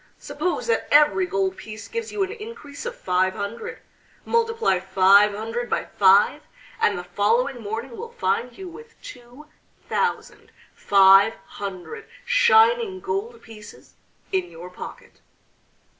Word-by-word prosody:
Suppose 350 Hz, +4 st, -3 dB
that 460 Hz, -, 0 dB
every 300 Hz, +5 st, +4 dB
gold 385 Hz, -1 st, -1 dB
piece 220 Hz, -10 st, -9 dB
gives 460 Hz, -1 st, -5 dB
you 410 Hz, -2 st, -1 dB
an 380 Hz, -, -4 dB
increase 440 Hz, -6 st, -9 dB
of 485 Hz, -, -6 dB
five 185 Hz, -, 0 dB
hundred; 200 Hz, +3 st, -6 dB, 0.4 s
multiply 455 Hz, -, +1 dB
five 195 Hz, +2 st, +4 dB
hundred 225 Hz, +3 st, -4 dB
by -, -, -1 dB
five, 195 Hz, +1 st, +3 dB, 0.4 s
and 205 Hz, -, +2 dB
the 180 Hz, -, -5 dB
following 230 Hz, +8 st, 0 dB
morning 225 Hz, +4 st, -6 dB
will 465 Hz, -, -8 dB
find 250 Hz, -, -2 dB
you 380 Hz, -, -8 dB
with 460 Hz, +7 st, -13 dB
two 245 Hz, +4 st, -12 dB, 0.4 s
thousand 470 Hz, +1 st, -3 dB, 0.2 s
five 195 Hz, +2 st, +5 dB
hundred 200 Hz, -, -8 dB, 0.2 s
shining 465 Hz, -4 st, +4 dB
gold 435 Hz, +3 st, -5 dB
pieces 210 Hz, -2 st, -14 dB, 0.4 s
in 185 Hz, -2 st, -1 dB
your 170 Hz, +2 st, -11 dB
pocket." -, -, -11 dB
255 Hz, 130 wpm, -23 LUFS, -, 0.4 s, five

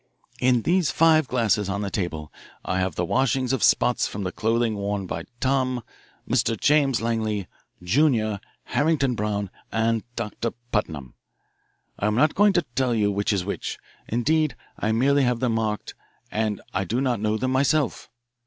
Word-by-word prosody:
"In 125 Hz, -2 st, +3 dB
these 175 Hz, -3 st, +2 dB
five 155 Hz, -3 st, +4 dB
glasses 110 Hz, -5 st, +1 dB
on 100 Hz, +1 st, -2 dB
the 100 Hz, -, -3 dB
table 80 Hz, -6 st, -3 dB, 0.3 s
I 95 Hz, -, 0 dB
have 95 Hz, -3 st, -1 dB
the 90 Hz, -, 0 dB
washings 130 Hz, +4 st, +1 dB
of 130 Hz, -, 0 dB
spots -, -, +3 dB
from 100 Hz, -, -5 dB
the 90 Hz, -, -2 dB
clothing 115 Hz, +1 st, 0 dB
worn 100 Hz, -1 st, -2 dB
by 85 Hz, -2 st, -5 dB
Tom, 130 Hz, -2 st, 0 dB, 0.4 s
Mr. 115 Hz, -3 st, +1 dB
James 145 Hz, -5 st, +3 dB
Langley, 110 Hz, -4 st, -1 dB, 0.4 s
Junior, 110 Hz, -, +2 dB, 0.2 s
Harrington 145 Hz, -4 st, +1 dB
Brown, 105 Hz, -3 st, -2 dB, 0.2 s
and 115 Hz, 0 st, +1 dB
Doctor 115 Hz, 0 st, -3 dB, 0.2 s
Putnam. 75 Hz, -, -2 dB, 0.9 s
I 100 Hz, -, +1 dB
am 105 Hz, -, +1 dB
not 150 Hz, +5 st, +3 dB
going 205 Hz, 0 st, +4 dB
to 175 Hz, -3 st, +1 dB
tell 125 Hz, -2 st, +1 dB
you 105 Hz, -2 st, +2 dB
which 100 Hz, +2 st, 0 dB
is 95 Hz, -3 st, 0 dB
which 100 Hz, -, -4 dB, 0.3 s
indeed 150 Hz, +3 st, +1 dB, 0.2 s
I 110 Hz, -, -1 dB
merely 140 Hz, +5 st, +3 dB
have 125 Hz, -2 st, +1 dB
them 125 Hz, -2 st, +1 dB
marked, 110 Hz, -2 st, -2 dB, 0.4 s
and 110 Hz, -2 st, -1 dB
I -, -, 0 dB
do 115 Hz, +6 st, -1 dB
not 125 Hz, -4 st, 0 dB
know 110 Hz, 0 st, +1 dB
them 130 Hz, +3 st, -1 dB
myself. 140 Hz, +2 st, +1 dB
115 Hz, 165 wpm, -24 LUFS, 105-130 Hz, 0.9 s, five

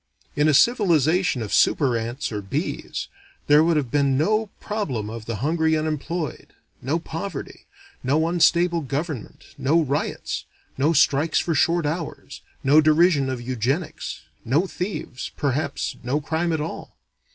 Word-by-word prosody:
In 150 Hz, +1 st, +3 dB
a 155 Hz, -, +4 dB
civilization 175 Hz, -, +3 dB
of 105 Hz, -, -5 dB
super 135 Hz, -5 st, +3 dB
ants 120 Hz, +5 st, -3 dB
or 105 Hz, -1 st, -3 dB
bees, 140 Hz, -, -4 dB, 0.4 s
there 150 Hz, +1 st, +6 dB
would 165 Hz, -1 st, +2 dB
have 135 Hz, -6 st, -1 dB
been 140 Hz, -2 st, +2 dB
no 215 Hz, +8 st, +1 dB
problem 135 Hz, -, -3 dB
of 115 Hz, -1 st, -8 dB
the 115 Hz, -, -2 dB
hungry 160 Hz, 0 st, +2 dB
unemployed, 155 Hz, +1 st, -3 dB, 0.3 s
no 140 Hz, +6 st, 0 dB
poverty, 165 Hz, +3 st, -6 dB, 0.3 s
no 150 Hz, +5 st, +1 dB
unstable 170 Hz, 0 st, +3 dB
government, 145 Hz, -2 st, -5 dB
no 155 Hz, +5 st, +3 dB
riots, 145 Hz, 0 st, -2 dB, 0.3 s
no 145 Hz, +4 st, +2 dB
strikes 155 Hz, +1 st, +3 dB
for 170 Hz, -, +1 dB
short 170 Hz, +2 st, +2 dB
hours, 160 Hz, +1 st, -5 dB, 0.2 s
no 145 Hz, +3 st, +6 dB
derision 155 Hz, -2 st, +4 dB
of 130 Hz, -2 st, -3 dB
eugenics, 130 Hz, +7 st, -3 dB, 0.2 s
no 145 Hz, +10 st, +2 dB
thieves, 180 Hz, -9 st, -5 dB
perhaps 140 Hz, 0 st, -1 dB
no 130 Hz, +4 st, -1 dB
crime 160 Hz, +3 st, -1 dB
at 160 Hz, -2 st, 0 dB
all. 160 Hz, -, -7 dB
155 Hz, 140 wpm, -23 LUFS, 135-170 Hz, 0.4 s, there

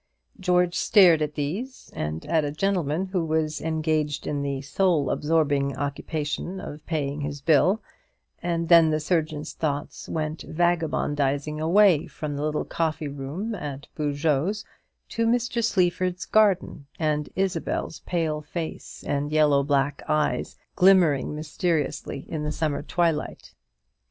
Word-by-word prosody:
George 180 Hz, -1 st, +2 dB
stared 175 Hz, -7 st, +5 dB
at 150 Hz, 0 st, -2 dB
these, 190 Hz, -, -4 dB
and 75 Hz, +1 st, -4 dB
at 160 Hz, -2 st, +2 dB
a 145 Hz, -, -2 dB
gentleman 175 Hz, 0 st, 0 dB
who 185 Hz, -2 st, -1 dB
was 155 Hz, -1 st, -1 dB
engaged 155 Hz, -2 st, -1 dB
in 145 Hz, -1 st, -2 dB
the 140 Hz, -1 st, -2 dB
soul 155 Hz, -1 st, +1 dB
absorbing 145 Hz, -3 st, +1 dB
occupation 150 Hz, +5 st, -3 dB
of 155 Hz, -6 st, -8 dB
paying 150 Hz, -3 st, -2 dB
his 145 Hz, 0 st, -4 dB
bill; 165 Hz, +8 st, +3 dB, 0.6 s
and 170 Hz, -1 st, -1 dB
then 165 Hz, -2 st, +7 dB
the 155 Hz, 0 st, +1 dB
surgeon's 155 Hz, -1 st, -1 dB
thoughts 145 Hz, -2 st, -3 dB
went 155 Hz, 0 st, -3 dB
vagabondizing 150 Hz, -3 st, 0 dB
away 175 Hz, -1 st, +4 dB
from 150 Hz, -2 st, -5 dB
the 140 Hz, -, -3 dB
little 150 Hz, 0 st, -1 dB
coffee 160 Hz, -2 st, -2 dB
room 145 Hz, +11 st, -4 dB
at 145 Hz, -8 st, -6 dB
Boujeot's 150 Hz, +6 st, 0 dB, 0.4 s
to 230 Hz, 0 st, 0 dB
Mr. 240 Hz, 0 st, +1 dB
Sleaford's 180 Hz, -3 st, +1 dB
garden, 190 Hz, -9 st, +2 dB
and 150 Hz, -2 st, 0 dB
Isabel's 180 Hz, -4 st, -2 dB
pale 160 Hz, -3 st, -1 dB
face 160 Hz, +2 st, -6 dB
and 145 Hz, +1 st, -2 dB
yellow 150 Hz, -2 st, +4 dB
black 140 Hz, 0 st, 0 dB
eyes, 150 Hz, -1 st, 0 dB, 0.2 s
glimmering 175 Hz, -7 st, +4 dB
mysteriously 150 Hz, -2 st, -2 dB
in 155 Hz, -, -4 dB
the 150 Hz, 0 st, -2 dB
summer 155 Hz, -2 st, -1 dB
twilight. 165 Hz, 0 st, -1 dB
155 Hz, 130 wpm, -25 LUFS, 145-175 Hz, 0.6 s, then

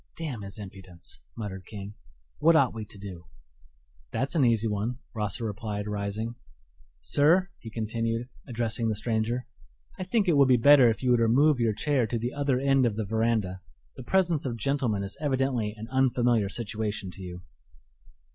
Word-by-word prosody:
"Damn 145 Hz, -9 st, -4 dB
his 100 Hz, +1 st, -7 dB
impudence!" 95 Hz, -4 st, -11 dB, 0.2 s
muttered 95 Hz, -4 st, -6 dB
King 100 Hz, -1 st, -8 dB, 0.5 s
"what 165 Hz, +2 st, +5 dB
ought 135 Hz, -5 st, +4 dB
we 110 Hz, -1 st, -6 dB
to 105 Hz, -, -12 dB
do?" 95 Hz, -4 st, -9 dB, 0.8 s
"That's 135 Hz, +3 st, -1 dB
an 160 Hz, -5 st, +3 dB
easy 115 Hz, -2 st, +3 dB
one," 110 Hz, +4 st, -2 dB, 0.2 s
Rosser 105 Hz, +1 st, -2 dB
replied, 105 Hz, -1 st, -4 dB
rising. 105 Hz, +2 st, -3 dB, 0.7 s
"Sir," 165 Hz, -, +4 dB
he 115 Hz, -, -9 dB
continued, 115 Hz, +1 st, -2 dB, 0.2 s
addressing 115 Hz, -1 st, -1 dB
the 110 Hz, -, 0 dB
stranger, 115 Hz, +3 st, -1 dB, 0.5 s
"I -, -, -2 dB
think 205 Hz, +1 st, +1 dB
it 165 Hz, -4 st, +4 dB
would 140 Hz, -1 st, +6 dB
be 125 Hz, -1 st, +5 dB
better 135 Hz, 0 st, +7 dB
if 115 Hz, -, -2 dB
you 125 Hz, -, +3 dB
would 120 Hz, -, +4 dB
remove 130 Hz, +5 st, +4 dB
your 115 Hz, -2 st, +2 dB
chair 135 Hz, -1 st, +1 dB
to 120 Hz, -, -2 dB
the 120 Hz, +3 st, -3 dB
other 140 Hz, -3 st, 0 dB
end 135 Hz, -2 st, +3 dB
of 110 Hz, -, -2 dB
the 110 Hz, -1 st, -2 dB
veranda. 110 Hz, -3 st, 0 dB, 0.3 s
The -, -, -8 dB
presence 170 Hz, +2 st, +1 dB
of 120 Hz, -3 st, -3 dB
gentlemen 120 Hz, -4 st, 0 dB
is 100 Hz, -, -7 dB
evidently 130 Hz, -6 st, 0 dB
an 110 Hz, +1 st, -7 dB
unfamiliar 120 Hz, -5 st, +2 dB
situation 105 Hz, -3 st, -3 dB
to 95 Hz, -, -12 dB
you." 90 Hz, -1 st, -8 dB
115 Hz, 175 wpm, -27 LUFS, 105-130 Hz, 0.8 s, better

